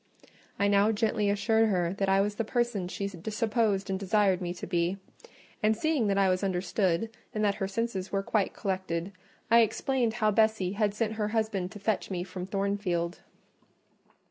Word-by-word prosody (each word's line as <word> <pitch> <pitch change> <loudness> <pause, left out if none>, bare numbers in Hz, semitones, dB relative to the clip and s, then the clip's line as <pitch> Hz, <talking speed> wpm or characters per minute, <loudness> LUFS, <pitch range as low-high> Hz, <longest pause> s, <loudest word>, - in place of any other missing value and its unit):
I 200 - +2
now 200 +1 +4
gently 215 -1 +1
assured 220 +2 +2
her 175 -3 +1
that 195 -1 +1
I 195 0 +4
was 205 +1 0
the 230 - -2
person 235 -5 -1
she 200 +2 -3
supposed 210 +2 -1
and 190 -1 -2
desired 195 -1 +2
me 175 -1 -2
to - - -6
be: 175 +1 0 0.6
and 215 0 +2
seeing 300 -5 +1
that 195 -1 +1
I 195 -1 +4
was 185 +1 +1
understood, 190 +2 0 0.2
and 215 0 +1
that 200 - +3
her 195 - +1
senses 200 -2 -3
were 195 -1 0
quite 205 -1 0
collected, 185 -2 -3 0.4
I 230 - +8
explained 235 +1 +1
how 215 -2 +2
Bessie 220 -3 +2
had 205 0 0
sent 220 0 -1
her 210 - +1
husband 215 -4 -1
to - - -8
fetch 210 0 -1
me 180 -2 -2
from 180 0 -7
Thornfield. 195 -3 -1
200 Hz, 180 wpm, -29 LUFS, 190-220 Hz, 0.6 s, I